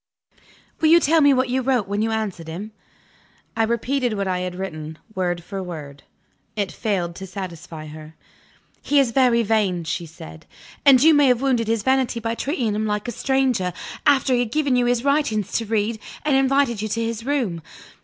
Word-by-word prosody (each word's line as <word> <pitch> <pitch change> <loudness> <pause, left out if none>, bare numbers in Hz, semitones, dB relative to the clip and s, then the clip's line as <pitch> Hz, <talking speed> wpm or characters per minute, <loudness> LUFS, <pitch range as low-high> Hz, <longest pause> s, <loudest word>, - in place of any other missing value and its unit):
Will 315 - +3
you 335 +1 +7
tell 320 0 +3
me 285 -1 +6
what 260 -1 +2
you 255 +2 0
wrote 250 -5 +1
when 205 +1 -1
you 225 - +1
answered 215 -7 -3
him?" 190 +7 -6 0.8
I 225 - 0
repeated 235 +2 0
what 200 -2 -2
I 185 -1 0
had 180 0 -4
written, 160 -4 -6 0.2
word 175 -3 -2
for 195 +2 -6
word. 150 -6 -8 0.5
It 200 -3 -2
failed 185 -6 -2
to 190 - -7
satisfy 170 -4 -7
her. 155 +1 -11 0.7
"He 290 - +2
is 265 -4 +2
very 240 -2 +3
vain," 200 -5 +1
she 170 +1 -4
said, 80 - -12 0.4
"and 265 -2 +7
you 320 +1 +7
may 290 -2 +5
have 250 0 +2
wounded 245 -5 +1
his 225 -2 0
vanity 260 -2 +1
by 225 0 -2
treating 245 - -1
him 215 +1 -1
like 210 +2 -2
a - - -2
stranger, 250 -7 0 0.3
after 270 -2 +4
he 245 - +3
had 240 -3 -1
given 285 -2 +1
you 245 -1 +2
his 245 0 +1
writings 280 -8 +1
to 230 - -5
read, 220 +1 0 0.3
and 295 -3 +3
invited 270 -4 +2
you 215 - -2
to 225 +2 -2
his 230 0 -4
room. 240 - -1
225 Hz, 195 wpm, -22 LUFS, 185-260 Hz, 0.8 s, you